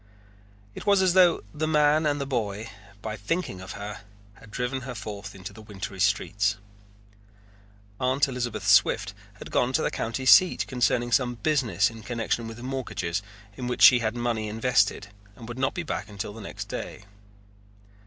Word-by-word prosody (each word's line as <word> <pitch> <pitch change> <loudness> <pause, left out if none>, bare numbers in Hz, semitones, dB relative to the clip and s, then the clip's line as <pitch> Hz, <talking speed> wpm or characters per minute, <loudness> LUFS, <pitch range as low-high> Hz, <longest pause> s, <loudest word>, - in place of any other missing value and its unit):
It - - -9
was 200 -2 +5
as 185 -2 +3
though 180 -3 +5
the 155 +1 -2
man 150 0 +3
and 145 0 0
the 140 - -2
boy, 110 -5 -3 0.3
by 110 -1 -3
thinking 100 - -3
of 95 +2 -8
her, 100 +1 -7 0.3
had 105 - -17
driven 125 +4 -3
her 130 -1 -7
forth 100 -1 -7
into 95 +1 -8
the 110 - -12
wintry 100 -2 -7
streets. 100 +1 +1 1.4
Aunt 130 +2 +2
Elizabeth 120 -5 -4
Swift 105 - +4 0.2
had - - -10
gone 125 +1 +1
to - - +2
the - - 0
county 115 +3 -3
seat 185 +7 +6
concerning 120 -1 0
some 120 -1 +2
business 120 -7 +1
in 115 -1 -11
connection 115 0 -2
with 115 +1 -8
mortgages 120 -9 -3 0.3
in 125 - -5
which 125 - 0
she 125 - +9
had 110 0 -1
money 120 -3 -1
invested 105 -2 +1 0.3
and 115 - -11
would 120 +2 -7
not 135 0 0
be 175 - -2
back 110 - -4
until 100 0 -6
the 110 - -10
next 100 - -7
day. - - -6
120 Hz, 175 wpm, -26 LUFS, 105-130 Hz, 1.4 s, she